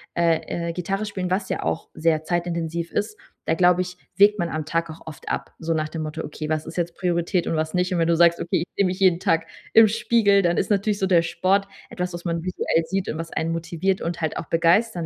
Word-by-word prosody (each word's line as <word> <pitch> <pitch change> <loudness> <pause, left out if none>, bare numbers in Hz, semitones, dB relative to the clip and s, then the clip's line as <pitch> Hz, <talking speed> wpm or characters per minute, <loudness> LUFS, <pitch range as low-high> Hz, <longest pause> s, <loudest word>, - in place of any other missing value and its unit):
äh, 170 0 0
äh, - - -3
Gitarre 195 +4 -2
spielen, 185 -3 -4
was 190 +1 -1
ja - - -2
auch - - -2
sehr 160 -1 +1
zeitintensiv 170 -1 -2
ist, 210 +1 -2 0.3
da 160 - +1
glaube 180 +1 +4
ich, 180 0 -6 0.2
wägt 205 +1 +6
man 170 -2 0
am 155 -1 -3
Tag 165 +2 -1
auch 155 - -12
oft 155 - -9
ab, - - -3
so 165 0 -1
nach 155 -1 -1
dem 160 0 -4
Motto: 155 +1 -5
„Okay, 155 0 -6
was 155 -1 -1
ist - - -8
jetzt 170 -1 -2
Priorität 175 -1 0
und - - 0
was 155 0 -1
nicht.“ 180 +1 0
Und - - 0
wenn 165 - +2
du 170 - +3
sagst: 170 0 +4
„Okay, 170 - 0
ich - - -11
sehe 200 - +3
mich 185 +1 -2
jeden 185 -3 +4
Tag 165 -4 +1 0.3
im 225 -1 +8
Spiegel,“ 220 -2 +3
dann 175 -1 +2
ist - - 0
natürlich 205 0 +1
so 190 - +1
der 175 -3 +4
Sport 190 +4 +1 0.2
etwas, 180 0 -4
was 175 0 -6
man 170 -1 -2
visuell 175 -2 0
sieht 190 +2 -2
und 155 - -3
was 165 0 -6
einen 160 +1 -1
motiviert 170 +3 -1
und 170 +1 -3
halt 160 -1 -1
auch - - -4
begeistern 170 +3 +2
170 Hz, 250 wpm, -23 LUFS, 165-190 Hz, 0.3 s, im